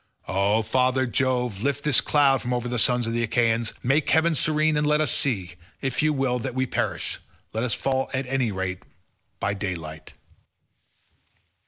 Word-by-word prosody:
O 100 Hz, +4 st, +1 dB
father 130 Hz, +3 st, +1 dB
Jove, 125 Hz, -4 st, -1 dB
lift 140 Hz, +2 st, -1 dB
this 150 Hz, -4 st, +5 dB
cloud 140 Hz, -3 st, +3 dB
from 125 Hz, 0 st, -2 dB
over 120 Hz, 0 st, -3 dB
the 120 Hz, -1 st, 0 dB
sons 125 Hz, +1 st, +3 dB
of 115 Hz, -, -2 dB
the 120 Hz, -, 0 dB
Achaeans; 115 Hz, -1 st, +1 dB
make 135 Hz, +5 st, +1 dB
heaven 160 Hz, +1 st, +3 dB
serene, 155 Hz, +1 st, +2 dB
and 150 Hz, 0 st, +1 dB
let 150 Hz, 0 st, +3 dB
us 150 Hz, -5 st, +1 dB
see; 100 Hz, -10 st, -1 dB, 0.3 s
if 135 Hz, -2 st, -1 dB
you 155 Hz, 0 st, +2 dB
will 135 Hz, -3 st, 0 dB
that 120 Hz, -, -5 dB
we 130 Hz, 0 st, +1 dB
perish, -, -, -2 dB, 0.3 s
let 110 Hz, +2 st, -1 dB
us 125 Hz, -, 0 dB
fall 135 Hz, -1 st, -1 dB
at 130 Hz, 0 st, -2 dB
any 125 Hz, -3 st, 0 dB
rate 95 Hz, -1 st, -4 dB, 0.6 s
by 100 Hz, -, -1 dB
daylight." 85 Hz, -6 st, -6 dB
125 Hz, 175 wpm, -24 LUFS, 110-135 Hz, 0.6 s, this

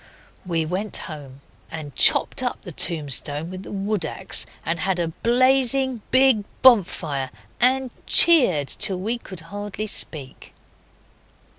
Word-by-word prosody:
We 165 Hz, -2 st, -1 dB
went 190 Hz, +6 st, -3 dB
home 140 Hz, -5 st, -11 dB, 0.3 s
and 150 Hz, -4 st, -9 dB
chopped -, -, +4 dB
up -, -, -4 dB
the -, -, -8 dB
tombstone 150 Hz, 0 st, -1 dB
with 185 Hz, 0 st, -8 dB
the -, -, -11 dB
wood 200 Hz, -1 st, -3 dB
axe 155 Hz, -, -3 dB, 0.2 s
and 165 Hz, 0 st, -2 dB
had 185 Hz, +3 st, -1 dB
a 170 Hz, -2 st, -2 dB
blazing 255 Hz, +4 st, +1 dB
big 260 Hz, -5 st, +3 dB, 0.2 s
bonfire, 170 Hz, -, +2 dB, 0.3 s
and 255 Hz, +1 st, +4 dB, 0.2 s
cheered 240 Hz, -, +6 dB
till 190 Hz, +5 st, -2 dB
we 225 Hz, +6 st, -3 dB
could 185 Hz, -7 st, -11 dB
hardly 205 Hz, +5 st, -7 dB
speak. 150 Hz, -9 st, -7 dB
190 Hz, 130 wpm, -21 LUFS, 160-240 Hz, 0.3 s, cheered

